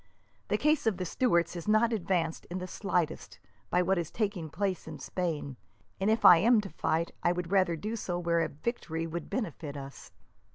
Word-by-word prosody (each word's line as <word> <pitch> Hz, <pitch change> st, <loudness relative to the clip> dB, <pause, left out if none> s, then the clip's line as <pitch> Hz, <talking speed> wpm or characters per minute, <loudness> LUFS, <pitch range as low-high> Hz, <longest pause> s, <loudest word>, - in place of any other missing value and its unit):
The -, -, +1 dB
cause 305 Hz, -5 st, +2 dB
of 210 Hz, -5 st, +2 dB
the 185 Hz, -, -3 dB
Stuarts 170 Hz, -5 st, +1 dB
is 170 Hz, -, -6 dB
not 220 Hz, +2 st, +4 dB
advanced, 175 Hz, -5 st, -1 dB
in 175 Hz, -, -5 dB
the 185 Hz, -, -4 dB
slightest, 175 Hz, -4 st, -2 dB, 0.3 s
by 180 Hz, +1 st, +3 dB
what 190 Hz, +1 st, +2 dB
is 170 Hz, -, -3 dB
taking 200 Hz, -7 st, -2 dB
place 190 Hz, +1 st, -2 dB
in 155 Hz, -2 st, -7 dB
Spain, 155 Hz, -8 st, -3 dB, 0.4 s
and 195 Hz, +2 st, +1 dB
if 220 Hz, +1 st, +2 dB
I 175 Hz, -, +11 dB
am 225 Hz, +6 st, +5 dB
to 195 Hz, -, -8 dB
fight, 165 Hz, +1 st, -1 dB
I 175 Hz, -, +3 dB
would 180 Hz, 0 st, -3 dB
rather 185 Hz, -4 st, +3 dB
do 215 Hz, +8 st, -4 dB
so 180 Hz, -5 st, -3 dB
where 170 Hz, -1 st, +1 dB
victory 165 Hz, -, -3 dB
would 165 Hz, -1 st, -5 dB
benefit 165 Hz, -, -4 dB
us." 140 Hz, 0 st, -9 dB
175 Hz, 195 wpm, -30 LUFS, 165-205 Hz, 0.4 s, I